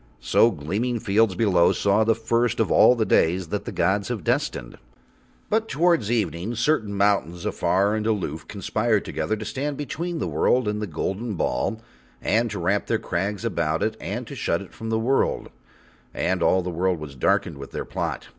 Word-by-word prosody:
So 65 Hz, 0 st, +4 dB
gleaming 110 Hz, +11 st, -2 dB
fields 110 Hz, -2 st, +2 dB
below 90 Hz, -5 st, +3 dB
saw 100 Hz, +2 st, +2 dB
the 110 Hz, 0 st, +3 dB
first 115 Hz, +2 st, 0 dB
of -, -, +1 dB
all 125 Hz, -, +6 dB
the 110 Hz, -2 st, 0 dB
days 85 Hz, -1 st, +2 dB
that -, -, -3 dB
the -, -, -4 dB
gods 95 Hz, +4 st, +1 dB
have 115 Hz, -7 st, -4 dB
destined. -, -, -2 dB, 0.7 s
But 220 Hz, +1 st, 0 dB
towards 160 Hz, -, +2 dB
evening 105 Hz, -1 st, -1 dB
certain 115 Hz, -4 st, 0 dB
mountains, 100 Hz, -4 st, +1 dB
afar 100 Hz, +2 st, +1 dB
and 110 Hz, 0 st, -1 dB
aloof, 85 Hz, -8 st, -2 dB
conspired 110 Hz, +2 st, 0 dB
together 110 Hz, -, -2 dB
to 110 Hz, -, -6 dB
stand 135 Hz, +6 st, -3 dB
between 165 Hz, +4 st, -4 dB
the -, -, -2 dB
world 125 Hz, -3 st, +2 dB
and 105 Hz, 0 st, -1 dB
the 105 Hz, -, -2 dB
golden 100 Hz, +6 st, -3 dB
ball 95 Hz, -, -1 dB, 0.4 s
and 115 Hz, +1 st, +1 dB
to 105 Hz, -, -5 dB
wrap 95 Hz, +3 st, 0 dB
their -, -, +1 dB
crags 100 Hz, +5 st, -3 dB
about 85 Hz, -5 st, 0 dB
it 110 Hz, +1 st, -1 dB
and -, -, -4 dB
to -, -, -9 dB
shut -, -, -1 dB
it -, -, -16 dB
from 115 Hz, -, -6 dB
the 110 Hz, -, +1 dB
world, 125 Hz, +5 st, 0 dB, 0.6 s
and 95 Hz, -1 st, 0 dB
all 95 Hz, +2 st, +3 dB
the 90 Hz, -, -3 dB
world 90 Hz, +1 st, 0 dB
was 75 Hz, -2 st, -8 dB
darkened 70 Hz, +2 st, 0 dB
with 70 Hz, -, -8 dB
their -, -, -5 dB
plot. -, -, -4 dB
105 Hz, 190 wpm, -24 LUFS, 90-115 Hz, 0.7 s, all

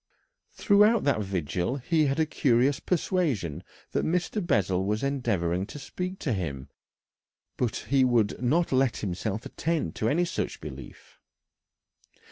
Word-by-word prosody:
Throughout 210 Hz, +2 st, +4 dB
that 140 Hz, -6 st, +2 dB
vigil 90 Hz, -, -2 dB
he 155 Hz, +3 st, +1 dB
had 140 Hz, +3 st, 0 dB
a 160 Hz, -, +4 dB
curious 135 Hz, -2 st, +2 dB
persuasion 140 Hz, -, -1 dB, 0.3 s
that -, -, 0 dB
Mr. 180 Hz, +5 st, -1 dB
Bessel 95 Hz, -, +1 dB
was 105 Hz, +4 st, -1 dB
endeavouring 100 Hz, -10 st, 0 dB
to -, -, -9 dB
speak 180 Hz, +6 st, -5 dB
to 130 Hz, -, 0 dB
him, 70 Hz, -8 st, -4 dB, 0.9 s
but 120 Hz, -3 st, -1 dB, 0.2 s
he 135 Hz, -1 st, +5 dB
would 120 Hz, -4 st, +2 dB
not 155 Hz, +8 st, +2 dB
let 130 Hz, -2 st, +2 dB
himself 100 Hz, +5 st, -3 dB
attend 160 Hz, -, -2 dB
to 110 Hz, -, +1 dB
any 175 Hz, +6 st, +2 dB
such 175 Hz, -, -3 dB
belief. -, -, -11 dB
130 Hz, 135 wpm, -27 LUFS, 95-160 Hz, 0.9 s, he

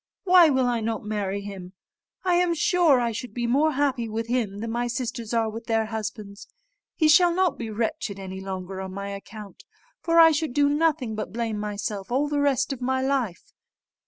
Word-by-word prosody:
Why 360 Hz, -4 st, +7 dB
will 265 Hz, -2 st, +2 dB, 0.2 s
not 220 Hz, -1 st, -2 dB
I -, -, -15 dB
marry 200 Hz, -2 st, -2 dB
him? 190 Hz, -2 st, -9 dB, 0.5 s
I 365 Hz, -2 st, +2 dB
am 350 Hz, -1 st, +2 dB
sure 340 Hz, -6 st, +3 dB
I 235 Hz, -1 st, 0 dB
should 235 Hz, +3 st, -7 dB
be 240 Hz, -1 st, -1 dB
more 290 Hz, +6 st, +2 dB
happy 260 Hz, -5 st, 0 dB
with 225 Hz, +1 st, -3 dB
him 230 Hz, -4 st, -1 dB
than 225 Hz, +2 st, -4 dB
my 240 Hz, +1 st, -1 dB
sisters 235 Hz, -2 st, -4 dB
are 230 Hz, -2 st, +1 dB
with 225 Hz, +1 st, -7 dB
their 225 Hz, -1 st, +1 dB
husbands. 215 Hz, -2 st, -6 dB, 0.5 s
He 310 Hz, -, +3 dB
shall 345 Hz, +3 st, +6 dB
not 365 Hz, 0 st, +1 dB
be 230 Hz, -2 st, -4 dB
wretched 220 Hz, -, -3 dB
any 190 Hz, -1 st, -7 dB
longer 190 Hz, 0 st, -6 dB
on 190 Hz, 0 st, -7 dB
my 200 Hz, 0 st, -5 dB
account; 200 Hz, 0 st, -10 dB, 0.4 s
for 335 Hz, 0 st, 0 dB
I 325 Hz, -1 st, +8 dB
should 305 Hz, -3 st, -1 dB
do 285 Hz, -1 st, +4 dB
nothing 295 Hz, -6 st, +1 dB
but 215 Hz, 0 st, -5 dB
blame 225 Hz, -2 st, -3 dB
myself 205 Hz, 0 st, -4 dB
all 275 Hz, +4 st, +1 dB
the 290 Hz, -1 st, 0 dB
rest 275 Hz, -1 st, +1 dB
of 260 Hz, -, -9 dB
my 260 Hz, +1 st, 0 dB
life." 260 Hz, -10 st, -2 dB
235 Hz, 200 wpm, -25 LUFS, 210-285 Hz, 0.5 s, I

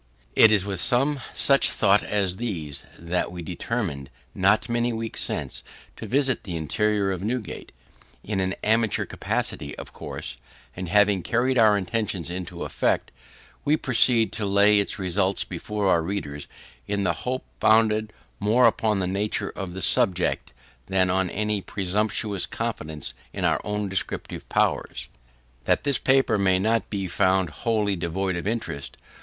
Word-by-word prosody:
It 110 Hz, -, +8 dB
was 105 Hz, -3 st, +3 dB
with 95 Hz, -3 st, -3 dB
some 135 Hz, +3 st, +2 dB
such 140 Hz, -2 st, +3 dB
thoughts 100 Hz, 0 st, +3 dB
as 95 Hz, -3 st, 0 dB
these 80 Hz, -12 st, -3 dB
that 85 Hz, +1 st, -2 dB
we 90 Hz, -1 st, -7 dB
determined, 85 Hz, -, -3 dB, 0.2 s
not 100 Hz, +3 st, +3 dB
many 120 Hz, 0 st, 0 dB
weeks 115 Hz, 0 st, -3 dB
since, -, -, -3 dB, 0.3 s
to -, -, -7 dB
visit 135 Hz, -1 st, +1 dB
the 90 Hz, -5 st, -5 dB
interior 100 Hz, +5 st, 0 dB
of 95 Hz, -2 st, -3 dB
Newgate 115 Hz, 0 st, -4 dB, 0.5 s
in 105 Hz, -2 st, -2 dB
an 95 Hz, 0 st, 0 dB
amateur 110 Hz, 0 st, +2 dB
capacity, 70 Hz, -, -3 dB
of -, -, -9 dB
course; -, -, -6 dB, 0.4 s
and, 90 Hz, -2 st, -5 dB
having 105 Hz, 0 st, +4 dB
carried 125 Hz, +6 st, +1 dB
our 110 Hz, -2 st, +6 dB
intention 100 Hz, -2 st, -2 dB
into 90 Hz, -1 st, -5 dB
effect, -, -, 0 dB, 0.5 s
we 150 Hz, +2 st, +3 dB
proceed 120 Hz, -4 st, +3 dB
to 110 Hz, -, -4 dB
lay 100 Hz, +1 st, +5 dB
its 100 Hz, -, -1 dB
results 95 Hz, 0 st, 0 dB
before 100 Hz, +3 st, -3 dB
our 85 Hz, -3 st, +4 dB
readers, 80 Hz, -5 st, -4 dB, 0.4 s
in 100 Hz, -1 st, -1 dB
the -, -, +2 dB
hope 130 Hz, +1 st, -3 dB
founded 110 Hz, -1 st, +3 dB, 0.3 s
more 115 Hz, +5 st, +4 dB
upon 110 Hz, -2 st, +2 dB
the 95 Hz, -, 0 dB
nature 100 Hz, +3 st, -2 dB
of 95 Hz, -3 st, -5 dB
the 95 Hz, -, -2 dB
subject, 90 Hz, -2 st, +2 dB, 0.4 s
than 95 Hz, -1 st, +2 dB
on 95 Hz, 0 st, +1 dB
any 105 Hz, +1 st, -1 dB
presumptuous 100 Hz, +1 st, -1 dB
confidence 75 Hz, -5 st, -4 dB, 0.2 s
in -, -, -2 dB
our -, -, +2 dB
own 105 Hz, 0 st, -2 dB
descriptive 95 Hz, -3 st, -3 dB
powers -, -, 0 dB, 0.6 s
that -, -, +2 dB
this 140 Hz, -1 st, +1 dB
paper 130 Hz, -5 st, +3 dB
may 95 Hz, -1 st, +3 dB
not 110 Hz, +2 st, +1 dB
be 100 Hz, -3 st, -2 dB
found 95 Hz, -1 st, +2 dB
wholly 105 Hz, -, 0 dB
devoid 90 Hz, +2 st, -2 dB
of 85 Hz, +2 st, -4 dB
interest. 105 Hz, -11 st, -4 dB
100 Hz, 155 wpm, -25 LUFS, 95-110 Hz, 0.6 s, It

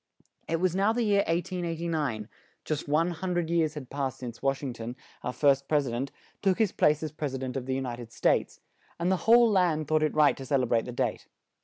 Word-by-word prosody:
It 165 Hz, 0 st, 0 dB
was 185 Hz, 0 st, +1 dB
now 200 Hz, +3 st, +3 dB
the 240 Hz, 0 st, 0 dB
year 200 Hz, -2 st, +3 dB
1889; 165 Hz, -, -2 dB, 0.4 s
just 150 Hz, -2 st, -3 dB
one 160 Hz, +4 st, +2 dB
hun 180 Hz, +1 st, -3 dB
dred 170 Hz, -1 st, -1 dB
years 160 Hz, -2 st, +1 dB
had 135 Hz, -4 st, -8 dB
passed 140 Hz, -2 st, -2 dB
since 120 Hz, -2 st, -8 dB
Wash 135 Hz, +1 st, 0 dB
ing 130 Hz, -3 st, -3 dB
ton, 120 Hz, +1 st, -6 dB, 0.3 s
our 125 Hz, -, -3 dB
first 140 Hz, 0 st, +2 dB
pres 150 Hz, -2 st, +2 dB
i -, -, -3 dB
dent, 130 Hz, +4 st, -3 dB, 0.3 s
took 190 Hz, -2 st, +2 dB
his 220 Hz, -5 st, +2 dB
place 150 Hz, +1 st, +2 dB
as 155 Hz, -, -3 dB
Pres 150 Hz, -3 st, -4 dB
i -, -, -2 dB
dent 130 Hz, 0 st, -5 dB
of 130 Hz, -1 st, -4 dB
the 130 Hz, -, 0 dB
U 135 Hz, -, -1 dB
nit 120 Hz, -2 st, -5 dB
ed 115 Hz, -2 st, -9 dB
States; -, -, +1 dB, 0.4 s
and 175 Hz, +2 st, +1 dB
the 190 Hz, -, +3 dB
whole 235 Hz, -1 st, +7 dB
land 170 Hz, -6 st, +2 dB
thought 155 Hz, 0 st, +2 dB
it 155 Hz, -, 0 dB
right 150 Hz, -1 st, +5 dB
to 135 Hz, -, -7 dB
cel 135 Hz, 0 st, +1 dB
e -, -, +2 dB
brate 115 Hz, -1 st, +1 dB
the 125 Hz, -, -5 dB
date. 120 Hz, -, -2 dB
150 Hz, 250 wpm, -28 LUFS, 130-170 Hz, 0.4 s, whole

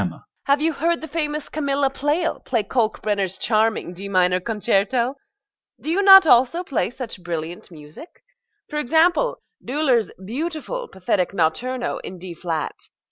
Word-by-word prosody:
GOLD -, -, 0 dB
(to -, -, -11 dB
Emma). -, -, -20 dB, 0.2 s
Have 280 Hz, +1 st, +2 dB
you 325 Hz, 0 st, +2 dB
heard 335 Hz, +4 st, 0 dB
the 315 Hz, -, -7 dB
famous 300 Hz, -1 st, -3 dB
Camilla 280 Hz, -2 st, 0 dB
Pleyel 295 Hz, +5 st, -1 dB
play 235 Hz, -4 st, 0 dB
Kalkbrenner's 205 Hz, -4 st, -1 dB
charming 215 Hz, -4 st, 0 dB
D 195 Hz, +3 st, -6 dB
minor 180 Hz, -1 st, +3 dB
concerto? 225 Hz, +4 st, 0 dB, 0.7 s
Do 315 Hz, -, -3 dB
you 380 Hz, +4 st, +2 dB
not 385 Hz, -2 st, +9 dB
also 265 Hz, +5 st, +4 dB
play 235 Hz, -, -1 dB
such 240 Hz, -5 st, -7 dB
brilliant 170 Hz, 0 st, -5 dB
music? 155 Hz, -, -13 dB, 0.4 s
for 300 Hz, -, -3 dB
example, 330 Hz, -, +2 dB, 0.3 s
Döhler's 260 Hz, -4 st, +1 dB
beautiful, 325 Hz, -, -4 dB
pathetic 185 Hz, 0 st, -1 dB
Notturno 240 Hz, +9 st, -1 dB
in 185 Hz, -, -8 dB
D 180 Hz, 0 st, -8 dB
flat. 165 Hz, -2 st, -3 dB
245 Hz, 150 wpm, -22 LUFS, 190-305 Hz, 0.7 s, not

